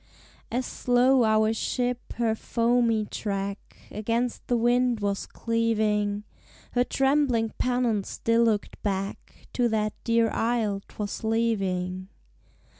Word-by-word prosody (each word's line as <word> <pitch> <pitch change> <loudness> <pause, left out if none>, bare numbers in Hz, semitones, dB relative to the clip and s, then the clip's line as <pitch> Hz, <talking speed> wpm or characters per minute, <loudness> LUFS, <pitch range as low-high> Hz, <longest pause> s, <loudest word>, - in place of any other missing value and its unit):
As 250 +2 -1
slow 250 +1 +3
our 220 0 +3
ship 245 +2 -2
her 230 -2 +1
foamy 230 -1 +1
track 200 -1 -4
Against 230 +3 -2
the 245 - +2
wind 240 0 +2
was 200 -1 -2
cleaving. 215 -3 0 0.5
Her 245 - +2
trembling 265 -4 +1
pennant 245 -5 +1
still 230 +1 +1
looked 215 -3 -1
back 195 -1 -4
To 245 -2 +2
that 215 -1 0
dear 230 -1 +2
isle 225 -4 0
'twas 205 +1 -5
leaving. 190 -5 0
225 Hz, 115 wpm, -26 LUFS, 210-245 Hz, 0.5 s, slow